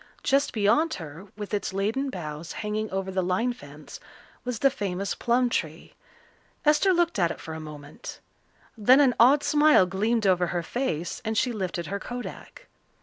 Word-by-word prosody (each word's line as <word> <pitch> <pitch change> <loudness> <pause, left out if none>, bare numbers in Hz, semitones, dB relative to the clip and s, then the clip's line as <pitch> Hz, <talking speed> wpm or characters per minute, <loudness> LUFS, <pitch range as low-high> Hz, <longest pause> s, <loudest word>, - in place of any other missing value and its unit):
Just 280 +1 +2
beyond 250 +10 +2
her, 165 +3 -9
with 210 -1 -7
its 200 -2 -2
laden 220 +8 -1
boughs 160 - -6
hanging 215 0 -3
over 190 0 -3
the 185 0 0
line 185 +7 0
fence, 145 -6 -12 0.4
was 250 -2 -3
the 275 +4 +3
famous 195 -4 -3
plum 245 +1 +1
tree. 240 - -3 0.7
Esther 300 +6 +4
looked 345 - +1
at 170 -2 +3
it - - -6
for 160 - -7
a 160 - -6
moment. 150 -1 -9 0.6
Then 250 +5 +5
an 270 -4 +5
odd 270 +5 +6
smile 300 -9 +5
gleamed 210 +5 0
over 180 -2 +3
her 175 0 -2
face 175 - -3
and 220 0 -2
she 250 - +2
lifted 185 -4 -3
her 200 +3 -4
kodak. 245 +4 -8
210 Hz, 170 wpm, -26 LUFS, 180-250 Hz, 0.7 s, odd